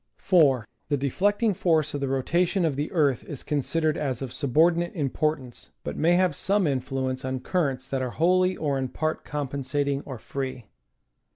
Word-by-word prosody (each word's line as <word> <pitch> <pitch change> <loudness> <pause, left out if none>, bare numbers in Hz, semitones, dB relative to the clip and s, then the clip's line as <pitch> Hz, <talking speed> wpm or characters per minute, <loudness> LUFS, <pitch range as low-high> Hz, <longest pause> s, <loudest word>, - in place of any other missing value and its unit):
4. 140 - +3 0.2
The 145 - +2
deflecting 205 - +1
force 160 -4 +1
of 145 - -3
the 140 - 0
rotation 170 +8 +1
of 155 -4 0
the 145 +2 -2
earth 145 - +2
is 140 - -7
consid 150 +3 -1
ered 155 +1 +2
as 135 -3 -2
of 125 -2 -6
subordinate 165 +5 +2
importance, 145 -3 -2
but 75 - -4
may 170 +3 +3
have 180 -4 +2
some 200 +3 +1
influence 130 -2 -2
on 130 0 -2
currents 135 -3 -1
that 135 -1 -2
are 130 - -1
wholly 185 +6 +2
or 140 -3 -1
in 130 - -1
part 155 +4 -2
compensating 140 0 -2
or 130 -3 -7
free. 130 -1 -5
145 Hz, 175 wpm, -26 LUFS, 130-165 Hz, 0.2 s, 4